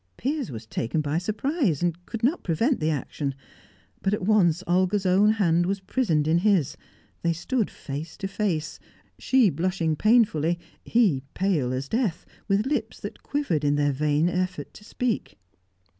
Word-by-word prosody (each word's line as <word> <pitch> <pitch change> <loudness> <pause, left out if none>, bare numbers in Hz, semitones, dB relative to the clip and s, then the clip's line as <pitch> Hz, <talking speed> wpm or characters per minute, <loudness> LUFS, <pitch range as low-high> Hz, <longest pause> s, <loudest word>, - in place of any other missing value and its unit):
Piers 280 -2 -2
was 115 -2 -7
taken 115 +6 -2
by 150 +2 -1
surprise, 215 - -1
and 175 0 -2
could 225 -1 -6
not 290 +9 +1
prevent 225 - +1
the 155 -1 0
action; 140 -1 -3 0.7
but 195 +1 +1
at 210 - -7
once 185 -5 +3
Olga's 185 +3 +1
own 200 +4 +4
hand 175 -5 +2
was 195 +1 -1
prisoned 190 - 0
in 165 +2 +3
his; 190 -7 +2 0.5
they 170 0 +1
stood 225 +7 -1
face 150 +3 -7
to 195 - -3
face, 195 -6 -2 0.4
she 255 -7 +4
blushing 165 0 0
painfully, 175 -6 +3 0.3
he 205 - +2
pale 170 -10 +1
as 130 +1 -3
death, 220 - -1 0.2
with 200 +1 +2
lips 290 +2 -2
that - - -8
quivered 280 - -1
in 145 0 +2
their 145 0 +2
vain 150 +3 +1
effort 180 +1 -2
to - - -14
speak. 235 - -3
180 Hz, 160 wpm, -25 LUFS, 155-215 Hz, 0.7 s, own